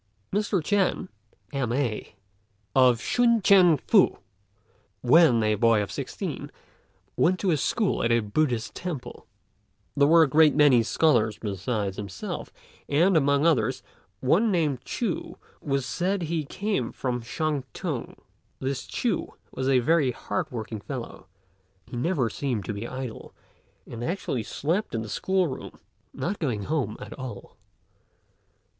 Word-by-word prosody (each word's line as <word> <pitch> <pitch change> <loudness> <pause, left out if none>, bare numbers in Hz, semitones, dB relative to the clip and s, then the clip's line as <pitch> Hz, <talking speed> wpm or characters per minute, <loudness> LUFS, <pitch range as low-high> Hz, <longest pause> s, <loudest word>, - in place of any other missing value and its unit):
Mr. 200 -4 0
Ch'ên, 190 0 +1 0.4
M.A., 125 -5 -2 0.6
of 125 -3 +5
Shun 235 - +3
t'ien 185 -5 +6
Fu, - - +3 0.8
when 125 -3 +5
a 110 0 +2
boy 115 +1 +3
of 100 - -7
sixteen, - - -5 0.7
went 185 +1 +2
to 185 -5 +2
school 200 - 0
at 115 - +2
a 115 - +4
Buddhist 115 +1 -1
temple. 170 -8 -6 0.7
There 140 0 +4
were 165 +1 +7
a - - +3
great 150 +1 +5
many 145 -5 +6
scholars 115 -4 +2
besides 100 -1 -3
himself, 100 -3 -6 0.4
and, 170 +6 +3
among 140 -1 +3
others, 130 -10 +2 0.4
one 185 - +3
named 150 -8 0
Ch'u, 215 -8 -3 0.3
who 140 -2 0
said 180 +8 -1
he 160 -1 -2
came 195 - -2
from 125 -2 -3
Shantung. 145 +4 -3 0.4
This 135 0 -3
Ch'u 230 -7 -1 0.2
was 130 0 -2
a 135 - +5
very 145 +2 +3
hard 110 -4 -3
working 110 -3 -6
fellow; - - -7 0.6
he - - -9
never 140 0 0
seemed 120 -5 -3
to - - -3
be 105 +3 -5
idle, 130 -3 -7 0.5
and 115 0 -7
actually 165 - -2
slept 165 - -2
in 110 - -2
the 110 - -8
school 190 - +1
room, 145 - -7 0.3
not 195 +4 -3
going 120 - -1
home 140 -4 -2
at - - -8
all. 130 -2 -8
140 Hz, 135 wpm, -26 LUFS, 115-170 Hz, 0.8 s, were